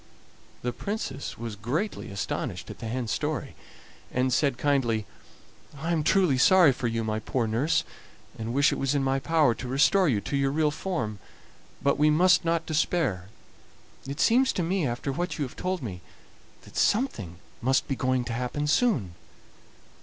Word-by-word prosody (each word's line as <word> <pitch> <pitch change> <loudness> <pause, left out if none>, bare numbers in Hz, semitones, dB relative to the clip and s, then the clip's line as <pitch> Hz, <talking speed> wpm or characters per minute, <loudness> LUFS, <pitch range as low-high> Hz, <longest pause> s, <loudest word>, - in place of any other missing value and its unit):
The 125 0 -1
Princess 140 - -4
was 115 -2 -5
greatly 125 - -3
astonished 100 0 -4
at - - -11
the 115 - -5
hen's 120 -1 -3
story, - - -2 0.6
and 125 0 +1
said 135 -2 +2
kindly: 120 -7 +1 0.7
"I 160 +4 -3
am 165 -2 +2
truly 170 -6 +3
sorry 180 +2 +6
for 125 -1 -2
you, 115 0 -1
my 110 0 -1
poor 115 +2 -1
nurse, 140 +9 +1 0.5
and 115 +1 -5
wish 140 +2 +3
it - - -4
was 135 +1 0
in 140 - +1
my 135 0 +1
power 155 -3 +3
to 125 - -7
restore 150 +8 +3
you 110 -6 +2
to 140 - -4
your 135 0 +2
real 150 +1 +1
form. 145 - -3 0.6
But 140 0 +2
we 150 +1 +5
must 180 +4 +4
not 165 0 0
despair; 155 - 0 0.8
it 140 +1 -5
seems 255 +3 +4
to 180 - -1
me, 175 -2 0
after 120 +3 -3
what 175 +6 -3
you 145 - -1
have 125 - -10
told 185 -3 -3
me, 90 -6 -6 0.6
that - - -16
something 120 - +1 0.3
must 130 +2 +2
be 135 - -1
going 130 -1 0
to 115 - -4
happen 125 +5 -2
soon. 150 - +2
135 Hz, 175 wpm, -27 LUFS, 120-165 Hz, 0.8 s, sorry